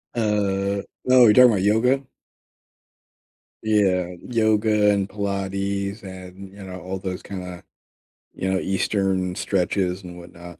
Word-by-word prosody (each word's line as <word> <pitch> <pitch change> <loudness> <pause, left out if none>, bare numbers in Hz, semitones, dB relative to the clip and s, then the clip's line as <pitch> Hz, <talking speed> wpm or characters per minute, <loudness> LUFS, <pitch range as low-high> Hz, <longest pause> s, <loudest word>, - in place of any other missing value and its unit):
Uh, 100 -3 0 0.3
oh, 130 -1 +7
you're 105 - +6
talking 125 +2 +8
about 110 -6 +3
yoga? 125 +6 +2 1.6
Yeah, 95 -4 +1
yoga 110 -2 +2
and 100 -1 0
Pilates 100 0 -3
and, 95 0 -10
you 100 0 -12
know, 95 -1 -8
all 95 +1 -5
those 95 -1 -5
kinda, 90 -3 -8 0.7
you 95 - -3
know, 95 - +1
eastern 95 -1 -1
stretches, 95 0 -1
and 90 -1 -10
whatnot. 85 0 -12
100 Hz, 125 wpm, -23 LUFS, 95-105 Hz, 1.6 s, talking